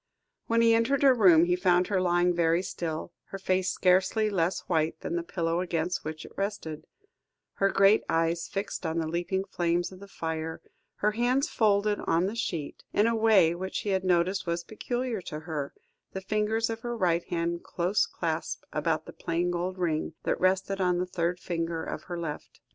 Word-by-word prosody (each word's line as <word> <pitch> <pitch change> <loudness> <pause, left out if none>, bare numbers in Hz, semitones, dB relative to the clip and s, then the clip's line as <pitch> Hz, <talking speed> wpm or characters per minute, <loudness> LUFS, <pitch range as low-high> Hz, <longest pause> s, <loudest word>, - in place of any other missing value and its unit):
When 230 0 +3
he 230 0 +6
entered 240 +5 +2
her 270 -2 +7
room, 180 -8 +6
he 175 0 +2
found 180 -1 +3
her 195 -3 +1
lying 175 0 +3
very 170 +1 +2
still, 165 -3 -4
her 195 - -7
face 185 -1 0
scarcely 190 +4 +2
less 180 -1 0
white 160 -2 0
than 170 - -3
the 170 - 0
pillow 170 -1 -1
against 175 -1 -1
which 155 0 -6
it - - -12
rested, 195 -6 -4 0.7
her 195 - +3
great 195 +2 +5
eyes 165 +1 +1
fixed 200 0 -4
on 160 -1 -2
the 160 -1 0
leaping 175 +3 -1
flames 175 -2 -1
of 185 - -12
the 200 - -11
fire, 160 -3 -4 0.4
her 210 - +1
hands 245 +5 +1
folded 205 -1 +2
on 170 +2 +3
the 200 - -2
sheet, 170 -10 -4
in 205 - +3
a 230 0 +2
way 215 -7 +5
which 190 +2 -4
he 210 - -3
had 190 -1 +1
noticed 185 +1 +1
was 170 0 -1
peculiar 240 +2 -3
to 155 -3 -6
her, 155 -4 -4 0.4
the 190 - -4
fingers 215 +3 0
of 225 - -4
her 240 0 -4
right 175 -4 +1
hand 170 0 -2
close 185 +4 0
clasped 165 -1 -3
about 155 +1 0
the - - -10
plain 175 +1 -1
gold 180 +2 -2
ring, 160 -3 -1
that - - -1
rested 190 +1 +1
on 180 -1 +2
the 180 - 0
third 175 0 -2
finger 165 -2 -3
of - - -6
her 175 -1 -5
left. 155 -3 -6
180 Hz, 195 wpm, -28 LUFS, 170-200 Hz, 0.7 s, her